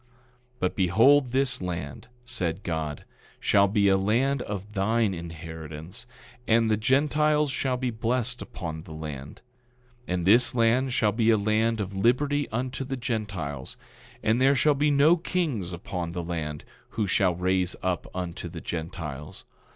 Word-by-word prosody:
10:10 125 - -35 0.5
But 95 -4 -1
behold, 115 +9 +4
this 130 -3 +1
land, 85 -7 -5 0.2
said 95 -6 -2
God, 80 -3 -3 0.3
shall 100 0 +4
be 100 0 +2
a 95 0 +5
land 125 +8 +1
of 105 -1 -6
thine 110 +1 +1
inheritance, 80 +3 -8 0.4
and 115 0 +3
the - - +4
Gentiles 150 +5 +2
shall 130 -1 -1
be 125 -1 -1
blessed 120 +2 -1
upon 80 -2 -6
the 80 -1 -11
land. 75 -3 -7 0.7
10:11 - - -2
And 90 -2 -2
this 120 +6 +5
land 120 +3 +3
shall 110 -3 +2
be 115 +2 +2
a 110 - +5
land 110 +2 +1
of 100 -1 -4
liberty 140 +8 +1
unto 130 +4 -3
the 135 0 -4
Gentiles, 100 - -4 0.5
and 110 +3 +2
there 135 +2 +5
shall 150 +3 +4
be 145 +1 +2
no 145 +4 +5
kings 155 - -2
upon 85 -1 -5
the 90 -1 -3
land, 80 -3 -4 0.3
who 110 - +2
shall 90 -1 +2
raise 90 +1 0
up 90 -2 -1
unto 90 -2 -4
the - - -7
Gentiles. 80 -3 -6
105 Hz, 160 wpm, -26 LUFS, 85-125 Hz, 0.7 s, a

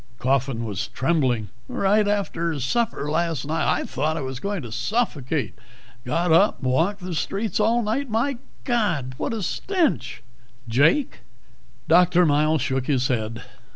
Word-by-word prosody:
Coffin 130 -2 0
was 105 +1 -3
trembling. 130 -5 0 0.2
"Right 205 +2 +2
after 170 -6 -1
supper 150 - -1
last 165 -3 0
night. 160 +2 0
I - - 0
thought 155 +4 -2
I - - -2
was 130 -1 -5
going 200 -3 -3
to 120 - -8
suffocate. 150 - -1 0.5
Got 170 +7 0
up 195 +6 +5
and 130 - +1
walked 185 +9 +1
the 180 0 -5
streets 200 +7 -2
all 230 +3 +2
night. 240 +6 -1
My 235 +4 0 0.2
God, 180 - 0
what - - -2
a 225 -3 -3
stench!" 360 - -1 0.4
"Jake?" 145 - +2 0.7
Dr. 180 +1 +5
Miles 155 -1 +2
shook 135 -2 -1
his 135 -3 +1
head. 115 -2 -2
160 Hz, 150 wpm, -23 LUFS, 130-205 Hz, 0.7 s, up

